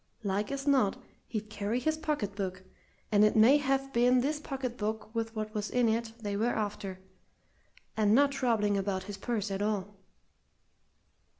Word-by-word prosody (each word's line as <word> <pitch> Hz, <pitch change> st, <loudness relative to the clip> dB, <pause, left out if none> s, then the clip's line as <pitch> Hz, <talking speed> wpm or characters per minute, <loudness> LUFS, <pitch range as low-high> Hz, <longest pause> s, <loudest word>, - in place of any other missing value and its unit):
Like 205 Hz, +2 st, -1 dB
as 275 Hz, 0 st, -3 dB
not 260 Hz, -8 st, +3 dB, 0.3 s
he'd 215 Hz, -2 st, -5 dB
carry 215 Hz, +3 st, -1 dB
his 315 Hz, +5 st, 0 dB
pocket 295 Hz, -11 st, -2 dB
book, 185 Hz, -2 st, -4 dB, 0.5 s
and 210 Hz, -1 st, +5 dB
it 210 Hz, -, +4 dB
may 230 Hz, +6 st, +7 dB
have 270 Hz, -1 st, 0 dB
been 245 Hz, +1 st, +4 dB
this 295 Hz, +3 st, -1 dB
pocket 265 Hz, -4 st, -4 dB
book 220 Hz, 0 st, -4 dB
with 225 Hz, -1 st, -3 dB
what 215 Hz, 0 st, -4 dB
was 210 Hz, -1 st, -2 dB
in 245 Hz, -1 st, +2 dB
it 225 Hz, 0 st, 0 dB
they 205 Hz, -2 st, -3 dB
were 225 Hz, +4 st, +1 dB
after, 205 Hz, -3 st, -3 dB, 1.0 s
and 215 Hz, 0 st, +4 dB
not 280 Hz, +2 st, +5 dB
troubling 225 Hz, -7 st, +1 dB
about 190 Hz, -1 st, -2 dB
his 200 Hz, 0 st, -7 dB
purse 215 Hz, -4 st, -2 dB
at 195 Hz, +1 st, -2 dB
all." 205 Hz, -1 st, -1 dB
220 Hz, 170 wpm, -30 LUFS, 205-250 Hz, 1.0 s, may